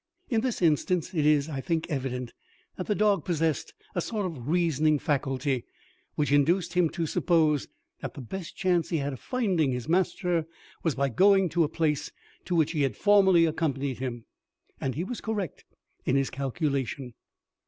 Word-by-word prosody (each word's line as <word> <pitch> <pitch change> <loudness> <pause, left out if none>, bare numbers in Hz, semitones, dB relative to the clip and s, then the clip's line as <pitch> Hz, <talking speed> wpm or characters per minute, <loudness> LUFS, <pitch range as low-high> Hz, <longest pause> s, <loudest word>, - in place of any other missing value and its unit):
In 225 -2 +2
this 245 -6 -2
instance 165 +3 +1
it 155 -4 +2
is, 150 -1 +4
I 140 -4 -4
think, 165 +2 -1
evident, 125 -5 -3 0.4
that 185 - -5
the 210 - +1
dog 200 -5 +2
possessed 165 -3 -1 0.2
a 175 - 0
sort 210 +2 -2
of 150 -10 -6
reasoning 155 -2 +2
faculty, 135 -2 -1 0.5
which 145 -2 0
induced 170 +5 +3
him 180 -3 +3
to 170 0 -2
suppose 155 -3 +2 0.3
that - - -6
the 140 - -7
best 170 +8 -7
chance 180 -3 +1
he 165 - 0
had 140 -1 -2
of 130 - -8
finding 190 - 0
his 125 +1 -4
master 175 -1 +1 0.3
was 165 -4 0
by 140 0 +1
going 195 - +4
to 170 +1 +2
a 150 - 0
place 155 -3 -1 0.3
to 180 - -1
which 160 -3 +3
he 155 -3 -1
had 135 -2 0
formerly 190 -5 +5
accompanied 140 -5 -1
him; 120 -3 -4 0.5
and 130 -2 -2
he 165 - -1
was 235 +5 -5
correct 205 -7 -4 0.4
in 130 - +1
his 135 -1 +1
calculation. 135 -2 -2
160 Hz, 175 wpm, -28 LUFS, 140-180 Hz, 0.5 s, formerly